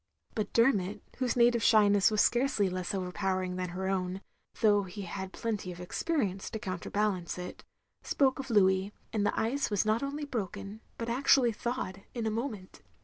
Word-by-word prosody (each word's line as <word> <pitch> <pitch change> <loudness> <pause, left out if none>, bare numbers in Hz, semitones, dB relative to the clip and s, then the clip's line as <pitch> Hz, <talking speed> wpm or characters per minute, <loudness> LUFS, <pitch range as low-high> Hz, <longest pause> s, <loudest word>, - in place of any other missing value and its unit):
But 215 - -2
Dermot, 210 -5 +2 0.2
whose 255 -2 +1
native 240 -1 +4
sh3mess 205 -3 +5
was 215 -1 +2
scarcely 240 -6 +2
less 185 +1 -3
overpowering 185 0 -1
than 180 -1 -3
her 190 +2 -3
own, 190 0 -1 0.4
though 205 -2 +5
he 195 +1 -7
had 190 +1 -5
plenty 210 -5 -3
of 175 - -9
experience 195 - -2
to - - -4
counter 185 -4 -5
balance 200 -5 -1
it 180 0 -7 0.2
— - - -51
spoke 270 -2 +2
of 265 -1 -5
Louis; 190 -2 +3 0.2
and 205 -2 +1
the - - 0
ice 265 +6 0
was 205 -1 +1
not 215 +2 +2
only 285 +2 -3
broken, 210 -4 -5 0.2
but 230 - -4
actually 250 0 +4
thawed, 220 -4 -4
in 235 -2 -2
a 220 - +1
moment. 220 -5 -5
205 Hz, 180 wpm, -30 LUFS, 190-235 Hz, 0.4 s, sh3mess